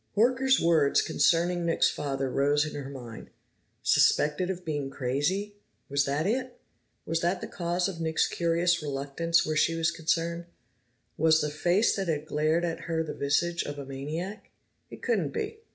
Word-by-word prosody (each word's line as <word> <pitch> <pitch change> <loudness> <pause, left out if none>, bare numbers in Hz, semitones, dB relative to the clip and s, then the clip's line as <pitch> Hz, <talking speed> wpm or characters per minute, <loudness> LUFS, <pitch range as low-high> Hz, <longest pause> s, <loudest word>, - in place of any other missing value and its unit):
Horker's 260 +4 +4
words 160 -4 +3
concerning 175 +1 +2
Nick's 165 -1 +2
father 135 -2 -2
rose 145 +2 +2
in 155 - -6
her 140 -2 -6
mind. 120 -5 -9 0.5
Suspected 150 +5 +3
of 180 -1 -4
being 145 -3 -2
crazy! 145 +12 -2 0.3
Was 140 0 +2
that 145 +3 -1
it? 250 +4 -2 0.5
Was 165 +1 -1
that 175 +2 0
the - - -5
cause 175 0 -1
of 175 -4 -6
Nick's 160 -1 +1
curious 170 0 +1
reluctance 145 +4 0
where 155 - -1
she 165 +2 +2
was 165 0 +1
concerned? 170 +1 -1 0.7
Was 160 0 +4
the 150 0 -1
face 175 +8 +2
that 195 -2 -2
had 155 -2 -1
glared 155 +3 +1
at 165 -1 -3
her 160 -1 0
the 155 - -5
visage 170 +5 0
of 145 0 -5
a 140 - -6
maniac? 155 +10 -6 0.4
It - - -12
couldn't 470 - 0
be. 445 0 -4
165 Hz, 170 wpm, -28 LUFS, 145-175 Hz, 0.7 s, Horker's